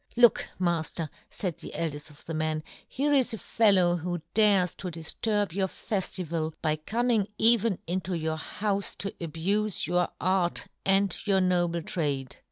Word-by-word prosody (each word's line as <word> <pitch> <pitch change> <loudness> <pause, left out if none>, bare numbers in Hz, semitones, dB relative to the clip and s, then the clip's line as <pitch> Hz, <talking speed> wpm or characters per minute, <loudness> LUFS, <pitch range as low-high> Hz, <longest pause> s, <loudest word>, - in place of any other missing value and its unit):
Look, 240 -2 +5
mafter,"faid 170 +1 -2
the - - -8
eldeft 150 -2 -3
of 150 - -15
the 165 - -5
men, 155 0 -1
" - - -26
here 290 +2 +2
is 260 -5 +2
a - - -7
fellow 190 -6 +3
who 175 -1 -4
dares 200 -5 +4
to 185 - -5
" - - -2
difturb 195 +4 -1
your 190 0 +1
feftival 170 -5 -2
by 155 -1 0
coming 225 +5 +1
" - - -46
even 230 -4 +2
into 180 +1 -2
your 160 0 -2
houfe 200 +4 -2
to 200 - -3
abufe 185 +6 -1
your 175 +1 +1
" - - -46
art, 185 -2 +1 0.2
and 195 -1 +4
your 195 -1 +4
noble 175 -2 +1
trade." 140 -7 -2
180 Hz, 170 wpm, -28 LUFS, 160-200 Hz, 0.2 s, Look